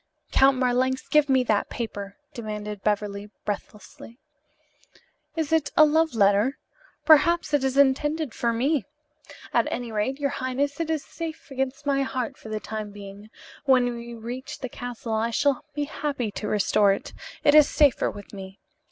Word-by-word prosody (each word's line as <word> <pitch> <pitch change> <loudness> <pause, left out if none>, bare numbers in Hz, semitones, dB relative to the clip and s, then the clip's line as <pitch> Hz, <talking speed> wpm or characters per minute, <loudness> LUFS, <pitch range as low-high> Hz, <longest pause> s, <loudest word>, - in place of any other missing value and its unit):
"Count 270 0 +5
Marlanx, 255 +1 +1
give 300 -2 +3
me 260 -1 +4
that 215 -4 0
paper!" 200 -4 -6 0.2
demanded 210 -3 -6
Beverly 205 0 -2 0.2
breathlessly. 210 +2 -7 1.2
"Is 320 -3 -2
it 315 -2 +2
a 310 - +9
love 315 -1 +2
letter? 205 +5 +3 0.5
Perhaps 320 +1 +5
it 290 -2 +3
is 265 0 0
intended 290 +1 +2
for 235 - 0
me. 265 +5 +1 0.7
At - - +3
any 240 -2 -4
rate, 220 +6 -1
your 280 -1 0
highness, 275 +3 -2
it 330 -1 -2
is 315 -3 -1
safe 320 -2 -7
against 270 +1 -3
my 275 -1 +2
heart 260 -3 -3
for 220 - -12
the 215 0 -2
time 215 -1 -5
being. 205 +1 -11 0.4
When 250 -3 +3
we 235 0 -8
reach 240 +3 -7
the 255 - -4
castle 240 -2 -6
I 220 +1 +1
shall 280 +3 +1
be 295 - -1
happy 280 -6 -3
to 210 - -5
restore 205 0 +3
it. - - -7 0.3
It 290 - +5
is 300 -1 +7
safer 290 -4 +3
with 205 0 -11
me. 195 0 -9
255 Hz, 165 wpm, -25 LUFS, 215-285 Hz, 1.2 s, a